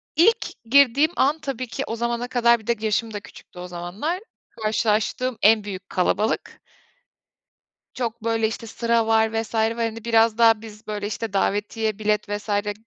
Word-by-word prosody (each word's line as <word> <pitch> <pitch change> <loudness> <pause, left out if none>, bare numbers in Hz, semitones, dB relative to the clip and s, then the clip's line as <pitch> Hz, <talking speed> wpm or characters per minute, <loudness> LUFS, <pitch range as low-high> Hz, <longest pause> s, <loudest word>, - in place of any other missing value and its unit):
İlk 435 - +2
girdiğim 280 +5 +4
an, 290 +4 +2
tabii 255 -4 -4
ki 255 +3 -4
o 225 - -3
zamana 235 +1 -2
kadar 235 -2 +3
bir 220 - -17
de 235 - +2
yaşım 220 +1 0
da 205 - -3
küçüktü 185 - -14
o 180 - -6
zamanlar. 180 - -4 0.3
Karşılaştığım 220 +3 -1
en 215 0 +5
büyük 190 -2 -7
kalabalık. 210 +4 -1 1.3
Çok, 230 -2 -4
böyle, 225 -1 +1
işte, 225 +1 -6
sıra 230 0 0
var 220 0 +3
vs. 225 +1 -8
var. 220 0 +2
Hani, 230 -1 -3
biraz 225 -1 +3
daha 225 -2 +5
biz, 215 -1 -12
böyle, 205 -1 -3
işte, 215 0 -5
davetiye 210 +2 -1
bilet 210 -1 0
vs. 205 +1 -4 0.2
g 205 0 -3
225 Hz, 170 wpm, -23 LUFS, 210-235 Hz, 1.3 s, en